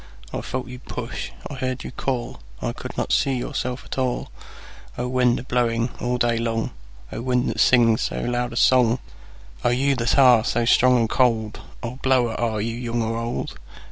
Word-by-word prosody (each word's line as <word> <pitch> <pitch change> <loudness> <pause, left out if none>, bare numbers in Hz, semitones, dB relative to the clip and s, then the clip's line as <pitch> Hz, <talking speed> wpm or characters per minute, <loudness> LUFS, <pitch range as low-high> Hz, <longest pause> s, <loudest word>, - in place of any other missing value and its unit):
I - - -2
felt 130 -1 -4
you 125 0 -8
push, 125 -1 -6 0.2
I - - -8
heard 130 -1 -3
you - - -6
call,I 120 - -4
could - - -8
not - - -1
see 135 - +2
yourself 125 +2 -3
at - - -5
all—O 125 -1 -5
wind, 125 -1 +2
a - - -5
blowing 120 -2 0
all 125 0 0
day 120 -1 +1
long,O 65 - -5
wind, 125 0 +1
that - - -6
sings 115 -3 +5
so - - -2
loud 120 +1 -1
a - - -7
songO 125 -1 +4 0.7
you 135 +3 +2
that 115 +2 +1
are 125 -5 +7
so 120 0 0
strong 125 +1 +5
and 115 -1 +2
cold,O 115 0 -1
blower, 130 -3 +2
are 110 -2 -1
you 115 +2 -2
young 120 -1 -2
or 115 +1 -2
old? 115 +1 -4
120 Hz, 170 wpm, -23 LUFS, 115-125 Hz, 0.7 s, are